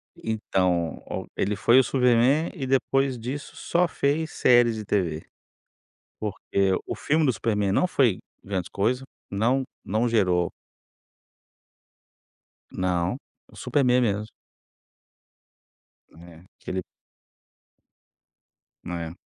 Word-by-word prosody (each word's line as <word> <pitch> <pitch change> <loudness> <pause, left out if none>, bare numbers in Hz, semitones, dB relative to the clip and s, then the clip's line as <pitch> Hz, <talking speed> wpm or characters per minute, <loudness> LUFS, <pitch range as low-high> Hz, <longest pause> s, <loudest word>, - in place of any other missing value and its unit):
Então, 90 -7 -1
o - - -4
ele 105 +2 0
foi 120 +6 +5
o 130 - +5
Superman 125 +5 +3
e 140 -8 -5
depois 135 0 +1
disso 130 +5 -6
só 175 +1 +1
fez 155 +1 -1
séries 120 -2 +4
de 110 -1 -6
TV, 85 -6 -1 1.0
porque 100 -2 -1
o - - -3
filme 155 +1 +1
do 130 - +3
Superman 105 -4 0
não 180 - +3
foi 125 - +2 0.3
grandes 95 -3 -3
coisas, 120 +6 0 0.3
não 120 +7 +1 0.2
não 110 +4 0
gerou 90 -6 +2 2.2
Não, 90 +3 -1 0.3
o - - -17
Superman 125 -3 +2
mesmo. 105 -3 0 1.8
Né, 85 0 -15 0.2
que - - -7
ele 95 -1 -2 2.0
É. 85 -2 -4
110 Hz, 105 wpm, -25 LUFS, 95-130 Hz, 2.2 s, foi